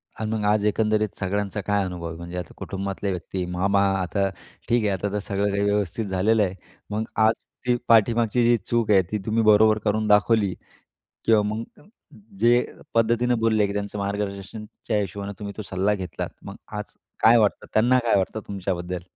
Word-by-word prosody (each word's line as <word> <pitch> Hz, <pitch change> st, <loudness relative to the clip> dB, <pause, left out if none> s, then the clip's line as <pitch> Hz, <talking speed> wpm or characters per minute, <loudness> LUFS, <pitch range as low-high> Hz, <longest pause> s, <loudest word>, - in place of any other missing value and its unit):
आणि 110 Hz, 0 st, -3 dB
मग 110 Hz, -2 st, -1 dB
आज 105 Hz, 0 st, +2 dB
एकंदरीत 105 Hz, 0 st, +1 dB
सगळ्यांचा 100 Hz, +1 st, -2 dB
काय 100 Hz, +1 st, 0 dB
अनुभव 90 Hz, -2 st, -5 dB
आहे, 80 Hz, 0 st, -7 dB
म्हणजे 85 Hz, +1 st, -7 dB
आता 90 Hz, -, -6 dB
कुटुंबातल्या 100 Hz, 0 st, -4 dB
व्यक्ती, 90 Hz, 0 st, -4 dB
मामा 95 Hz, +3 st, +1 dB, 0.2 s
आता 95 Hz, +2 st, 0 dB, 0.4 s
ठीक 120 Hz, -1 st, +3 dB
आहे 105 Hz, -, +2 dB
आता 100 Hz, +1 st, -2 dB
तर 105 Hz, -, 0 dB
सगळं 100 Hz, 0 st, -1 dB
काही 100 Hz, +1 st, 0 dB
व्यवस्थित 100 Hz, +1 st, 0 dB
झालेलं 100 Hz, +3 st, +2 dB
आहे. 95 Hz, -1 st, -2 dB, 0.3 s
मग 105 Hz, +1 st, -1 dB, 0.2 s
आज 110 Hz, -, -1 dB, 0.2 s
ती 125 Hz, -, +4 dB
पाठीमागची 115 Hz, +1 st, +4 dB
जी 120 Hz, 0 st, +4 dB
चूक 115 Hz, -3 st, +1 dB
आहे, 95 Hz, -, +6 dB
ती 105 Hz, -, 0 dB
तुम्ही 110 Hz, +1 st, +1 dB
बरोबर 110 Hz, 0 st, +5 dB
करून 110 Hz, +1 st, +1 dB
दाखवली 105 Hz, -1 st, +3 dB, 0.7 s
किंवा 110 Hz, -2 st, +4 dB
मग 110 Hz, +2 st, -2 dB, 0.8 s
जे 120 Hz, +1 st, +4 dB, 0.3 s
पद्धतीनं 120 Hz, +1 st, +2 dB
बोलले, 110 Hz, -2 st, +2 dB
की 100 Hz, -, -4 dB
त्यांचं 100 Hz, 0 st, -4 dB
मार्गदर्शनच्या 100 Hz, +2 st, -4 dB
हिशोबाने 100 Hz, +1 st, -4 dB
तुम्ही 100 Hz, -1 st, -6 dB
तो 110 Hz, -, -5 dB
सल्ला 95 Hz, +3 st, +1 dB
घेतलात. 95 Hz, -3 st, -5 dB
मग -, -, -9 dB, 0.2 s
आज -, -, -7 dB, 0.3 s
काय 115 Hz, +2 st, +7 dB
वाटतं, 105 Hz, -2 st, +1 dB
त्यांना 125 Hz, +4 st, +4 dB
काय 115 Hz, -4 st, +2 dB
वाटतं 95 Hz, +3 st, -2 dB
तुमच्याबद्दल? 90 Hz, -2 st, -3 dB
105 Hz, 175 wpm, -24 LUFS, 100-110 Hz, 0.8 s, काय